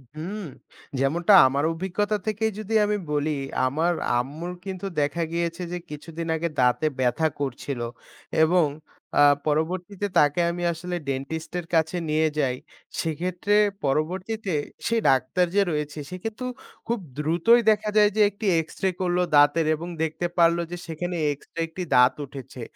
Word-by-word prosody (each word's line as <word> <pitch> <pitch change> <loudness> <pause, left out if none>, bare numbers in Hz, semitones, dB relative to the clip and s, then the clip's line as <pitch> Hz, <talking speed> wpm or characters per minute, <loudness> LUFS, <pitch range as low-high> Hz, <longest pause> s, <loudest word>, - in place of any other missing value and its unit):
হুম, 190 +7 -5 0.6
যেমনটা 165 +8 +3
আমার 140 +2 0
অভিজ্ঞতা 190 +5 -1
থেকেই 220 +1 0
যদি 215 +1 -5
আমি 210 0 0
বলি, 150 +1 0 0.4
আমার 160 +7 +1 0.2
আম্মুর 150 +8 -3
কিন্তু 190 0 -5 0.2
দেখা 145 +4 0
গিয়েছে 170 +1 -2
যে 180 - -2
কিছুদিন 165 +2 -6
আগে 170 +1 -1
দাঁতে 125 +3 +3
ব্যাথা 130 +5 +2
করছিল 135 -1 -3 0.6
এবং 175 +1 +4 0.5
আ 145 - +8 0.2
পরবর্তীতে 180 +6 -1
তাকে 145 +2 +4
আমি 175 0 -4
আসলে 175 +2 -5
ডেন্টিস্ট 155 +5 -4
এর 170 - -7
কাছে 160 +2 +2
নিয়ে 155 +1 +3
যাই, 130 -3 +1 0.5
সেক্ষেত্রে 180 +5 -1 0.3
পরবর্তীতে 185 +7 -1 0.3
সে 230 - +1
ডাক্তার 135 +7 +2
যে 200 - +5
রয়েছে 150 0 -3
সে - - -6
কিন্তু 225 +3 -4 0.4
খুব 235 -1 0 0.2
দ্রুতই 170 +10 +4
দেখা 215 0 +2
যায় 210 -1 +6
যে - - +4
একটি 205 +2 -8 0.2
এক্সরে 190 +4 -2
করলো 180 -1 +1
দাঁতের, 145 +3 +5
এবং 170 +3 -7 0.2
দেখতে 160 +2 -2
পারলো 170 0 +4
যে 175 - -4
সেখানে 175 +2 -4 0.2
এক্সট্রা 165 +3 -8
একটি 180 +3 -6
দাঁত 125 +1 +6
উঠেছে। 135 -2 -10
165 Hz, 150 wpm, -25 LUFS, 150-185 Hz, 0.6 s, আ